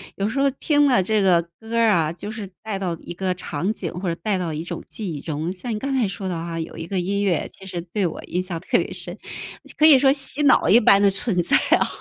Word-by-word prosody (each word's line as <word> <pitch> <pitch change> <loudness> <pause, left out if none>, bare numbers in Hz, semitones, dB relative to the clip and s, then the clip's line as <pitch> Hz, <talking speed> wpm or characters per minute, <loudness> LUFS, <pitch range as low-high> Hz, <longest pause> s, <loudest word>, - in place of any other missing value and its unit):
有 200 - -1
时 255 +5 -2
候 275 - +3
听 290 +2 +2
了 250 -8 +3
这 215 +2 +1
个 180 -3 +4 0.2
歌 225 +1 -5
儿 230 -1 +4
啊， 160 -5 +2
就 205 +4 -7
是 215 -3 -7
带 215 -3 -4
到 175 -3 -3
一 - - -8
个 185 +1 -2
场 180 +2 -3
景 175 -6 -5
或 180 +1 -3
者 165 - -2
带 205 -4 0
到 170 -3 -3
一 155 +1 -4
种 175 - -6
记 200 -6 -5
忆 145 - -7
中， 160 +3 -3
像 210 +6 -6
你 - - -3
刚 270 +5 -3
才 250 -5 +1
说 195 0 -5
的 185 - -2
哈， 165 0 -5
有 160 - -6
一 165 - -6
个 195 0 -1
音 200 +3 -1
乐 180 -6 0
其 195 - -14
实 180 -2 -5
对 200 -4 +1
我 160 - -7
印 180 - -2
象 180 -2 -5
特 175 - +1
别 - - -3
深， - - -6 0.6
可 310 - +4
以 295 -4 +8
说 270 0 +5
洗 275 +1 +3
脑 270 - +4
一 205 +7 +7
般 200 -3 +6
的 200 -1 +4
存 195 -1 +1
在 - - +4 0.2
啊， - - +1
195 Hz, 295 characters per minute, -22 LUFS, 175-225 Hz, 0.6 s, 以